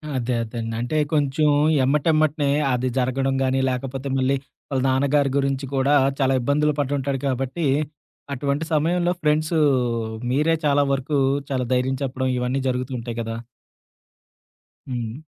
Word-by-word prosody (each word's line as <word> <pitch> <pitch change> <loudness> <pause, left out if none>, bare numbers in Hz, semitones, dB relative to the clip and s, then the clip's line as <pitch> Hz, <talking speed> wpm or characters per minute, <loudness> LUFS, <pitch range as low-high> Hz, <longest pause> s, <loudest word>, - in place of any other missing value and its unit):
అదే 125 -1 -1
అదేండి. 115 0 -4
అంటే 120 +6 -1 0.2
కొంచెం 150 0 +2 0.4
ఎమ్మటెమ్మటనే 150 +1 +2 0.2
అది 125 +1 0
జరగడం 135 +1 0
గానీ, 130 0 +1
లేకపోతే 130 +1 -4
మళ్ళీ 135 +1 +2 0.4
వాళ్ళ 135 -2 0
నాన్నగారి 140 +2 +2
గురించి 135 0 0
కూడా 135 +2 +2 0.3
చాలా 135 -1 +3
ఇబ్బందులు 150 +4 +2
పటుంటాడు 140 -1 -1
కాబట్టి, 135 +5 -2 0.7
అటువంటి 140 +3 -1
సమయంలో 175 +3 +2
ఫ్రెండ్స్ 155 +1 +1 0.8
మీరే 150 +5 +2
చాలా 145 0 +3
వరకు 135 +2 -1 0.3
చాలా 130 -2 -1
ధైర్యం 130 +1 +1
చెప్పడం 130 0 -2
ఇవన్నీ 125 +2 -1
జరుగుతూంటాయి 125 -2 -4
కదా! 115 0 -4 1.5
హ్మ్. 120 -1 -4
135 Hz, 120 wpm, -23 LUFS, 125-145 Hz, 1.5 s, చాలా